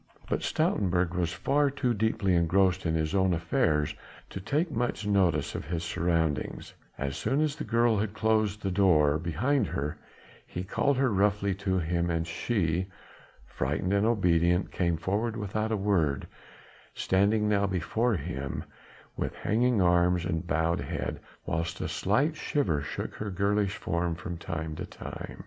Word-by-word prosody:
But - - -1
Stoutenburg 90 -3 +1
was 85 -2 0
far 140 - +1
too 135 -3 0
deeply 105 -3 +1
engrossed 90 +2 +2
in 80 - +1
his 80 +1 -1
own 95 -2 +3
affairs 80 -2 +1 0.4
to - - -5
take 150 - 0
much 120 -5 -1
note 95 -5 +3 0.2
of - - -5
his 85 +1 -3
surroundings; 85 -3 -1 0.2
as 70 0 -3
soon 135 +6 0
as 155 -2 +1
the 155 - -5
girl 115 -2 +2
had 105 0 -2
closed 110 -1 +1
the 95 - 0
door 80 -6 +4
behind 110 - 0
her, 75 +1 -3 0.5
he 90 - -5
called 140 +8 +1
her 130 -4 +2
roughly 100 0 +2
to 95 -1 -1
him 85 0 0
and 85 -1 0
she 85 0 -1 0.6
frightened 75 +8 -2
and 100 +2 +3
obedient 90 -5 +2
came 85 -2 0
forward 105 +7 -1
without 110 +1 -2
a 110 - +1
word, 85 -9 +1 0.7
standing 105 +3 +2
now 100 -1 +2
before 105 +6 0
him, 70 -4 -4 0.5
with - - -3
hanging 115 -1 +2
arms 90 0 +3
and 80 +1 -2
bowed 80 +2 +1
head, - - -4 0.3
whilst 80 0 -2
a - - -2
slight 140 - +1
shiver 95 - 0
shook 75 - -5
her 105 - -5
girlish 100 +1 +1
form 85 0 -1
from 90 0 -6
time 80 -2 -4
to - - -4
time. - - -8
95 Hz, 160 wpm, -28 LUFS, 85-105 Hz, 0.7 s, door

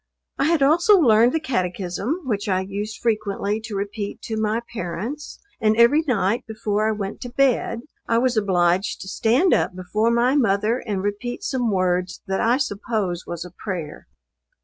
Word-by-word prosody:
I - - +3
had 320 -2 +3
also 340 +8 +5
learned 235 - +5
the 320 - 0
Catechism, 200 - -2
which 210 -6 -2
I 185 -1 +2
used 205 +3 -5
frequently 215 -2 -1
to 220 -2 -6
repeat 200 +1 -4
to 220 - -4
my 220 +1 0
parents, 220 - -5 0.2
and 220 0 +2
every 235 +7 +6
night, 225 -2 +1
before 215 -1 -1
I - - +2
went 205 -2 -5
to 245 - -5
bed, 245 -2 +1 0.3
I 230 - +2
was 250 +1 +2
obliged 185 -3 +1
to 190 - -8
stand 240 - +2
up - - +1
before 210 +5 0
my 240 +3 +2
mother 220 -2 +2
and 200 -5 -3
repeat 205 +4 -3
some 245 -3 0
words 180 -1 0
that 190 0 -1
I 235 +3 +3
suppose 205 -7 -2
was 170 0 -5
a 180 - -10
prayer. 175 -5 -6
215 Hz, 170 wpm, -22 LUFS, 195-245 Hz, 0.3 s, every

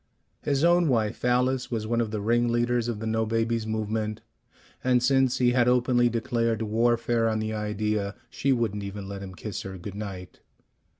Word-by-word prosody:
His 140 0 0
own 175 0 +4
wife, 110 -6 0
Alice, 125 +1 +1
was 110 -3 -2
one 115 +1 +1
of 115 - -1
the 105 -1 -3
ringleaders 120 +1 +1
of 120 -3 -2
the 110 - -5
"no 110 0 +1
babies" 115 0 0
movement, 110 0 -2 0.6
and 125 -1 +3
since 135 -1 +3
he 125 -1 +3
had 120 -1 +3
openly 125 -1 +3
declared 115 -1 0
warfare 115 +1 +1
on 110 - 0
the 110 0 -2
idea, 105 -1 -2 0.2
she 140 - 0
wouldn't 115 -5 0
even 100 0 -6
let 100 0 -6
him 95 -2 -8
kiss 100 0 -5
her 95 -1 -7
good 90 +3 -7
night. 95 -3 -7
115 Hz, 180 wpm, -26 LUFS, 105-120 Hz, 0.6 s, own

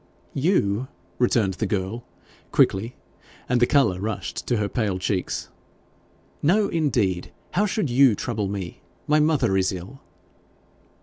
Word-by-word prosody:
'You!' 130 - +1 0.3
returned 115 -5 +2
the 110 +4 -2
girl 100 +4 -2 0.5
quickly, 110 +6 +2 0.5
and 125 0 +2
the 120 - +4
colour 135 -11 +3
rushed 105 +1 -4
to 120 - +1
her 105 -1 0
pale 100 -3 -1
cheeks. 95 0 -2 0.9
'No, 200 +7 +3
indeed. 115 - 0 0.2
How 205 +4 +2
should 185 - -1
you 130 -2 +5
trouble 110 -2 -2
me? 95 -3 -5 0.2
My 150 +1 +3
mother 150 -10 +2
is 95 -1 +2
ill.' 95 +9 -8
115 Hz, 130 wpm, -24 LUFS, 95-140 Hz, 0.9 s, you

